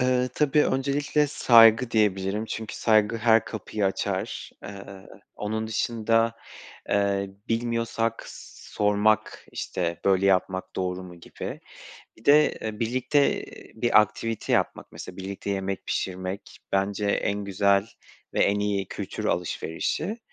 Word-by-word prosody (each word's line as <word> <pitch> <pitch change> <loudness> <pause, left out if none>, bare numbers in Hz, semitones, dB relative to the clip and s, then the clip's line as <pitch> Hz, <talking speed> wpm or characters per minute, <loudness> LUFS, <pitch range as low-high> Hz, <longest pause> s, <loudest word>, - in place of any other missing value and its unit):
Eee, 125 0 +2
tabii. 150 0 +3
Öncelikle, 140 +2 +1
saygı 115 -3 +6
diyebilirim 105 -1 +1
çünkü 110 0 -5
saygı 110 0 +3
her 115 0 +4
kapıyı 105 -1 -3
açar. 95 - -3
Eee, 100 -1 -10 0.3
onun 110 +1 -3
dışında, 115 0 +1 0.6
eee, 100 -1 +1 0.2
bilmiyorsak 115 -1 -1 0.5
sormak, 105 +1 +1
işte, 85 -2 -3
böyle 95 0 +3
yapmak 95 -1 +1
doğru 90 0 -2
mu, 90 -1 -11
gibi. - - -7 0.6
Bir 110 - -20
de, 150 +1 +6
eee, 110 -1 -6
birlikte 130 +5 +1 0.3
bir 120 -1 +5
aktivite 110 +1 -2
yapmak. - - 0
Mesela, 90 - -9
birlikte 95 +1 -5
yemek 95 0 -3
pişirmek, 95 +2 -4
bence 100 +1 0
en 100 0 0
güzel 100 +1 +2 0.5
ve - - +1
en 100 +1 +2
iyi 100 -2 -1
kültür - - -6
alışverişi. 90 - -2
105 Hz, 120 wpm, -26 LUFS, 100-115 Hz, 0.6 s, saygı